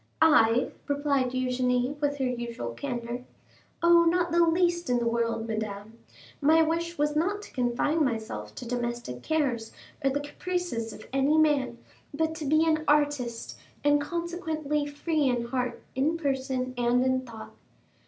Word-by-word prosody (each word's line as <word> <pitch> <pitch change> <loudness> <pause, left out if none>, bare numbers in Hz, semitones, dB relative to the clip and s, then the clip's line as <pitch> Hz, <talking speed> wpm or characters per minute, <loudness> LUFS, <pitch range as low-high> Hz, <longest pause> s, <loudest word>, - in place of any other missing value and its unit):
"I?" 250 -6 +5 0.2
replied 285 -2 +1
Eugénie 250 +1 0
with 285 -1 0
her 265 - 0
usual 235 - -3
candor. 240 - -4 0.6
"Oh, 340 0 +6
not 345 0 +2
the 340 0 +5
least 345 0 +2
in 245 - +3
the 235 -1 0
world, 230 -1 0
madame! 215 0 -5 0.4
My 320 +3 +5
wish 335 +2 -1
was 295 0 +1
not 395 +7 0
to - - -13
confine 255 +6 +1
myself 220 - -3
to 245 - -7
domestic 240 - -3
cares, 255 - -1 0.3
or 275 - +4
the 275 +2 -1
caprices 290 -6 -3
of - - -11
any 275 +3 +3
man, 285 -6 +2 0.4
but 320 +1 0
to 310 - -5
be 310 +3 +3
an 310 -1 +2
artist, 290 -6 0 0.2
and 290 0 +4
consequently 315 -3 -2
free 295 0 0
in 240 -1 0
heart, 250 0 -2
in 295 +6 +1
person, 265 -4 -1
and 245 +1 +2
in 260 0 +2
thought." 230 -4 -10
270 Hz, 155 wpm, -28 LUFS, 240-315 Hz, 0.6 s, Oh